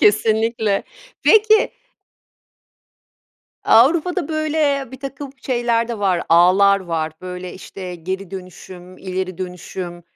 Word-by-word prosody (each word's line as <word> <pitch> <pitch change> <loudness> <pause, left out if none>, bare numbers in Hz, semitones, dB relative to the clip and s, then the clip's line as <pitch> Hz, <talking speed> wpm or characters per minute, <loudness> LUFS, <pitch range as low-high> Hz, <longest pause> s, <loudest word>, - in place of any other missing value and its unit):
Kesinlikle. 220 0 +2 0.4
Peki 435 0 +5 1.9
Avrupa'da 320 +8 +4
böyle 305 -4 0
birtakım 275 +1 -7
şeyler 240 -2 0
de 230 -3 -4
var, 185 -4 +1
ağlar 190 +4 +5
var, 165 -3 -3
böyle, 180 0 -7
işte, 185 -1 -8
geri 185 +2 -5
dönüşüm, 185 -1 -10
ileri 185 -1 -4
dönüşüm, 180 -1 -6
200 Hz, 95 wpm, -20 LUFS, 180-260 Hz, 1.9 s, Peki